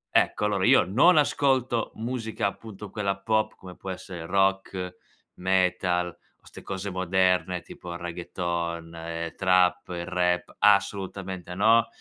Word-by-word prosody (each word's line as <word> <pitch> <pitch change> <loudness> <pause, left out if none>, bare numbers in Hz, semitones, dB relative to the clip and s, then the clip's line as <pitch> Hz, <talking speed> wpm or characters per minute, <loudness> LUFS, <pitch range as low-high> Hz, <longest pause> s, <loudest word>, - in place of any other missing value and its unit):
Ecco. - - +3
Allora 100 -2 0
io - - +6
non 145 - +5
ascolto 130 -5 +2
musica, 115 -2 -3
appunto, 105 0 -5
quella 100 -2 -1
pop 110 +1 0
come 90 -1 -11
può 95 - -8
essere 90 -2 -7
rock, 95 -1 0 0.4
metal 90 -1 +1
o 85 - -22
ste - - -11
cose 95 +1 -5
moderne 90 -1 +1
tipo 90 - -10
il 85 - -5
reggaeton 85 -1 -4
e 85 0 -5
trap, 90 -1 +3
il 85 -1 -4
rap. 90 -1 0
Assolutamente 95 -3 +1
no, 115 +4 +4
95 Hz, 135 wpm, -26 LUFS, 90-105 Hz, 0.4 s, io